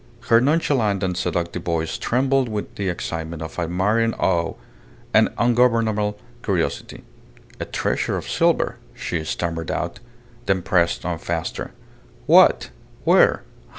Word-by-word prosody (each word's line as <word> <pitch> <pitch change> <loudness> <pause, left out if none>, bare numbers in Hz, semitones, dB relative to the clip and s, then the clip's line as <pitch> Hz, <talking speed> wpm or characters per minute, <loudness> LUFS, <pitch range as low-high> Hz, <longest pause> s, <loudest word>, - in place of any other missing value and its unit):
Her 115 0 +7
nonchalant 130 - +1
and 90 -1 -1
seductive 85 -1 -2
voice 85 -2 -2
trembled 130 +1 +1
with 105 -1 -4
the 100 -2 -2
excitement 80 -2 -4
of 80 - -7
admiring 105 +7 +1
awe 85 -3 0 0.6
and - - +5
ungovernable 115 -3 +2 0.2
curiosity. 95 -7 -2 0.6
"A - - -3
treasure - - -1
of - - -6
silver!" - - +1 0.2
she 80 -2 -3
stammered 80 0 -3
out. 85 0 -3 0.5
Then 95 -2 +1
pressed 85 -2 +1
on 85 -2 -2
faster: 85 -1 -4 0.5
"What? - - +5 0.3
Where? - - +4
95 Hz, 120 wpm, -22 LUFS, 85-115 Hz, 0.6 s, Her